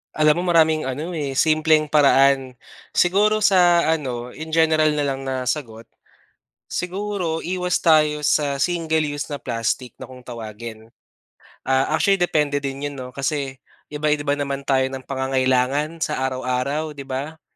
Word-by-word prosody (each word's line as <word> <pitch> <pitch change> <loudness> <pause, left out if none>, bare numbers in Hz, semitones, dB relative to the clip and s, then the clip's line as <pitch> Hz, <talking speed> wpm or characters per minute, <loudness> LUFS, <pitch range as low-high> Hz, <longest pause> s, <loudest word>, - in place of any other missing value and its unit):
Alam 155 +2 +3
mo - - -2
maraming 160 -4 +3
ano 150 +7 -4
eh, 145 -5 -3
simpleng 155 0 +3
paraan, 135 -3 +4 0.4
siguro 210 +4 +3
sa 175 -4 +5
ano 130 -6 -2
in 155 +4 -8
general 160 -1 +3
na 145 - 0
lang 135 -1 -3
na 130 -1 -2
sagot, 120 -4 -3 0.8
siguro 180 -3 -3
iwas 180 0 -1
tayo 150 -2 +3
sa 145 -1 +1
single 160 +1 0
use 145 -1 -4
na 145 - -4
plastic 120 -1 -3
na - - -8
kung 125 -1 -13
tawagin. 110 -1 -8 0.8
Ah, 135 0 +1
actually 195 -2 +2
depende 150 -4 +1
din 140 +1 -4
yun 145 - -4
'no 130 -2 -7
kasi 135 0 -3 0.3
iba-iba 150 -1 0
naman 140 -1 -3
tayo 135 -1 +1
ng 130 0 -5
pangangailangan 130 +3 0
sa 155 -4 -2
araw-araw 130 +4 -2
di 140 - -8
ba? 140 +4 -6
145 Hz, 145 wpm, -22 LUFS, 130-160 Hz, 0.8 s, sa